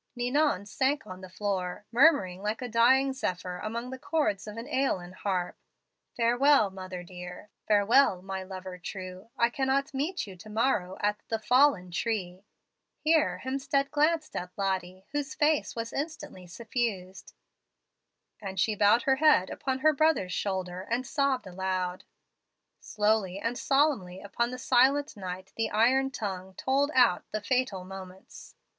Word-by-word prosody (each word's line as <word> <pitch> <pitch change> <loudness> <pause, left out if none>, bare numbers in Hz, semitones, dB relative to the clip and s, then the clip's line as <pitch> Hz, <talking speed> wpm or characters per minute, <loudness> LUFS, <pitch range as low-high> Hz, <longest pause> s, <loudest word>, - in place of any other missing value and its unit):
"Ninon 250 -3 +1
sank 265 +6 0
on 185 0 -9
the 185 - -10
floor, 190 0 -3
murmuring 230 - +4
like 215 +5 -2
a - - -3
dying 260 +4 +4
zephyr 180 -7 -3
among 235 +3 -4
the 260 - -7
chords 255 -11 -1
of 210 +1 -7
an 230 - -5
AEolian 255 -11 -1
harp, 185 -2 -2 0.6
'Farewell, 245 -1 +4
mother 185 -1 -7
dear. 180 +3 -10 0.2
Farewell, 205 -1 +4
my 190 0 -4
lover 185 -1 -8
true. 185 +2 -8
I 235 0 +3
cannot 275 +2 0
meet 300 +6 -2
you 195 -2 -10
to 195 +5 -12
morrow 210 -5 0
at 210 0 0
the 225 - -1
FALLEN 225 -5 +3
TREE' 185 -2 -3 0.5
(here 315 0 +2
Hemstead 275 +1 0
glanced 310 +1 +1
at 180 - -4
Lottie, 190 -1 -2
whose 290 0 -3
face 300 0 +1
was 230 0 -4
instantly 285 - -5
suffused); 195 -2 -4 1.1
and 190 -2 -5
she 215 - +2
bowed 210 +3 +4
her 265 -1 +3
bead 300 -12 +5
upon 265 -1 -3
her 310 +1 +5
brother's 305 -11 +2
shoulder, 185 -2 -2
and 235 +6 -2
sobbed 275 -3 0
aloud. 185 -1 -3 0.7
"Slowly 210 -3 0
and 230 +4 -2
solemnly 270 -11 +1
upon 220 +5 -2
the 255 - -6
silent 270 +4 +3
night 185 -1 -7
the 225 - -1
iron 260 +5 +3
tongue 190 -7 -5
tolled 275 +6 +1
out 240 -8 +4
the 215 - -1
fatal 250 -4 -1
moments. 190 0 -11
215 Hz, 150 wpm, -28 LUFS, 185-265 Hz, 1.1 s, bead